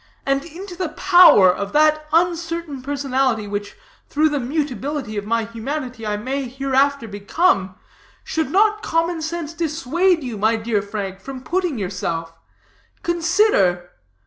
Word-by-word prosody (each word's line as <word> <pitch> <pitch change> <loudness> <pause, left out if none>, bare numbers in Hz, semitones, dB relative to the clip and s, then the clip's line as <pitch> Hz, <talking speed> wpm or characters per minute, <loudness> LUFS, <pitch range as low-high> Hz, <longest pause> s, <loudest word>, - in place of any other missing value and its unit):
And 275 0 +1
into 355 +3 -9
the 360 -2 -3
power 340 - +6
of 200 +1 -5
that 305 0 +3
uncertain 335 -3 0
personality 265 -5 -1
which, 205 0 -5 0.3
through 310 +2 +2
the 290 -1 -1
mutability 275 -2 -3
of 205 0 -4
my 230 0 +1
humanity, 240 0 -5
I 210 0 -1
may 260 +5 -3
hereafter 270 0 0
become, 200 - 0 0.5
should 320 -4 -2
not 425 +5 +3
common 330 -4 -1
sense 325 0 -4
dissuade 330 +1 0
you, 235 -5 -5
my 220 +3 +3
dear 220 -2 -1
Frank, 200 -2 -5
from 260 +3 -8
putting 355 -5 -1
yourself? 170 -4 -3 0.7
Consider. 335 - +2
275 Hz, 135 wpm, -21 LUFS, 215-330 Hz, 0.7 s, power